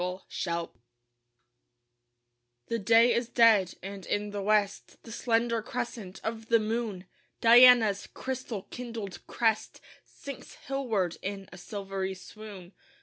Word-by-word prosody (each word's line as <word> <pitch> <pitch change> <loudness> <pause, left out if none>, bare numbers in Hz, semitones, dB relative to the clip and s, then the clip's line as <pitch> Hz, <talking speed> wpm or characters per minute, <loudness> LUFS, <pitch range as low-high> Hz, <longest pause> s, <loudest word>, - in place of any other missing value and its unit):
DIONYSIA 180 -2 -3 2.0
The 230 - -1
day 230 +4 +5
is 235 0 -1
dead; 220 -7 +4
and 195 0 -7
in 205 0 -1
the 205 0 -4
west 205 0 0
The 225 - -11
slender 230 0 0
crescent 230 -5 -5
of 225 0 -4
the 230 - +5
moon 215 -3 -3 0.3
Diana's 235 -3 +7
crystal 255 -6 -5
kindled 225 -7 -6
crest 225 -2 0 0.2
Sinks 280 -1 -10
hillward 225 -11 -1
in 195 0 -5
a - - -10
silvery 195 -1 -4
swoon. 195 -1 -11
215 Hz, 115 wpm, -29 LUFS, 195-235 Hz, 2.0 s, Diana's